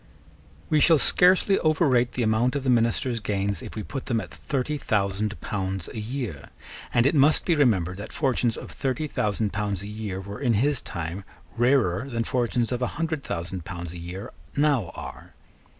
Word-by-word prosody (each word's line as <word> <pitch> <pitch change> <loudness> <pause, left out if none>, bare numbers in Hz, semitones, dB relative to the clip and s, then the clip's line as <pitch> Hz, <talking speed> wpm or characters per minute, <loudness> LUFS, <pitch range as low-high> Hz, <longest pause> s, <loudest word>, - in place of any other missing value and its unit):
We 155 - +5
shall 160 +2 +6
scarcely 185 +5 +4
overrate 135 -7 +3
the 125 - 0
amount 115 +4 +2
of 140 - -1
the 130 - +2
minister's 115 +1 +1
gains, 100 -3 -1
if - - -8
we 110 - -4
put 135 +4 -6
them 115 -3 +1
at - - -8
thirty 145 +2 -2
thousand 105 -1 0
pounds 95 -3 -3
a 110 - -6
year: 110 - -5 0.4
and 120 - +3
it 140 - +4
must 150 +1 +4
be 175 - +3
remembered 95 - +2
that 100 - -7
fortunes 130 -7 0
of - - -8
thirty 135 +3 -2
thousand 105 -5 -1
pounds 100 -1 -2
a - - -6
year 105 -3 -4
were 100 +3 -7
in 125 -4 +2
his 135 +5 +2
time 85 +4 -5 0.3
rarer 120 -3 +2
than 115 -2 -1
fortunes 120 -1 0
of 125 0 -1
a 125 - +1
hundred 160 -3 -2
thousand 85 +1 -4
pounds 85 -1 -6
a 90 - -8
year 90 +3 -7 0.3
now 140 - +2
are. - - -9
115 Hz, 185 wpm, -26 LUFS, 100-135 Hz, 0.4 s, shall